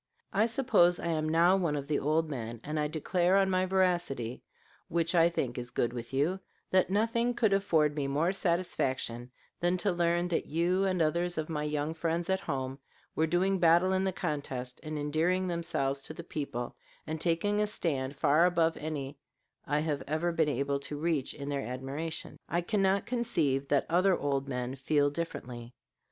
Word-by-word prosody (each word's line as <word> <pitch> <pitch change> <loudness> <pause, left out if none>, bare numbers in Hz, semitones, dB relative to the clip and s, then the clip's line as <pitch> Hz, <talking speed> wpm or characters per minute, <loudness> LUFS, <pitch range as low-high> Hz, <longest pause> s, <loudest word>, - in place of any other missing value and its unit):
I 215 +3 +3
suppose 225 -8 +3
I - - -5
am 155 -1 0
now 170 +3 +5
one 170 -6 0
of 140 -1 -3
the 145 0 0
old 155 +3 +1
men, 120 -5 -5
and 150 +1 -3
I 150 - +1
declare 175 +4 +1
on 195 -1 +3
my 185 0 +2
veracity, 175 -11 0 0.5
which 165 0 0
I 170 -1 +5
think 125 -8 -2
is 120 0 -6
good 120 0 -1
with 120 -1 -6
you, 150 +8 +1 0.3
that 185 -1 +3
nothing 230 +4 +1
could 220 -4 +2
afford 160 -7 +2
me 145 -2 -1
more 155 +7 +1
satisfaction 135 -10 -1 0.3
than 175 +1 +2
to 200 +2 +1
learn 175 0 +1
that 170 - -1
you 175 +5 +1
and 185 -3 +2
others 170 +3 0
of 155 0 -2
my 150 -2 -2
young 150 +1 -1
friends 165 +2 -1
at 190 - +2
home 135 -6 -4 0.3
were 160 - +1
doing 185 +3 +1
battle 175 +2 +5
in 190 0 +1
the 190 - +1
contest 140 -8 -4
and 155 -1 -5
endearing 165 +6 +1
themselves 140 -5 -1
to 155 - -8
the 170 - -7
people 140 -7 -4 0.3
and 155 0 -4
taking 190 +5 +1
a 210 - +2
stand 140 -9 -2
far 150 +5 +4
above 165 -2 +2
any 145 -2 -5 0.5
I 150 0 +1
have 150 -3 -1
ever 160 +4 0
been 160 -2 +2
able 140 +1 0
to 145 +1 -6
reach 155 -3 -1
in 140 -1 -7
their 140 -1 -1
admiration. 135 +6 -5
I 175 - +1
cannot 195 +1 +1
conceive 160 - 0
that 140 -1 +2
other 180 +2 +3
old 140 -1 -1
men 125 -1 -3
feel 145 +2 +1
differently. 125 -7 -6
160 Hz, 185 wpm, -30 LUFS, 140-180 Hz, 0.5 s, now